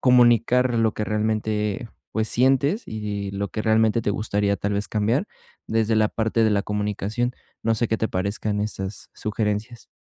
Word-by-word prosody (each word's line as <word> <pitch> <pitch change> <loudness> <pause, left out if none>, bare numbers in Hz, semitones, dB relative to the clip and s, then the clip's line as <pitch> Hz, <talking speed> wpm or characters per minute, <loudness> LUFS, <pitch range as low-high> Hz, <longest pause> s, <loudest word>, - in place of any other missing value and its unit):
comunicar 125 0 +4
lo 110 -1 +3
que 105 - -2
realmente, 105 0 -1 0.2
pues, 110 -1 0
sientes 135 - +2
y 105 -2 -4
lo 100 0 -2
que 110 +4 -4
realmente 110 +1 +3
te 105 - 0
gustaría, 100 -1 0
tal 100 0 -2
vez, 105 +1 -1
cambiar 115 - +1 0.4
desde 110 0 +1
la 110 0 +4
parte 110 +1 +1
de 110 - +3
la 100 -1 +2
comunicación, 105 +3 -1 0.3
no 115 0 +2
sé 115 +1 0
qué 110 - +1
te 110 - 0
parezcan 100 +2 -1
esas 100 -1 -4
sugerencias. 110 +2 -3
110 Hz, 170 wpm, -24 LUFS, 105-115 Hz, 0.4 s, comunicar